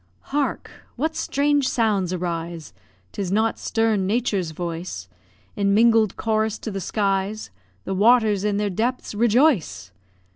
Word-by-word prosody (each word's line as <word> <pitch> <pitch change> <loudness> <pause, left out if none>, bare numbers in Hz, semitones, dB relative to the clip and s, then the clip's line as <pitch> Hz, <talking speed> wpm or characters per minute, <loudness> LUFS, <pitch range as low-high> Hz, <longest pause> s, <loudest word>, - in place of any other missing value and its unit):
Hark! 290 -1 -1 0.2
what 315 +5 -2
strange 285 -1 +1
sounds 210 -7 +1
arise 170 - -4 0.4
'Tis 190 -3 -4
not 220 +3 +1
stern 220 -4 0
Nature's 205 -5 0
voice 165 - -5 0.5
In 200 0 +1
mingled 225 -2 +4
chorus 220 -1 0
to 220 - -6
the 195 -1 -4
skies! 195 - -1 0.3
The - - -2
waters 215 0 +4
in 210 -1 0
their 205 -1 -1
depths 240 +7 -2
rejoice. 230 - +2
210 Hz, 125 wpm, -23 LUFS, 185-230 Hz, 0.5 s, mingled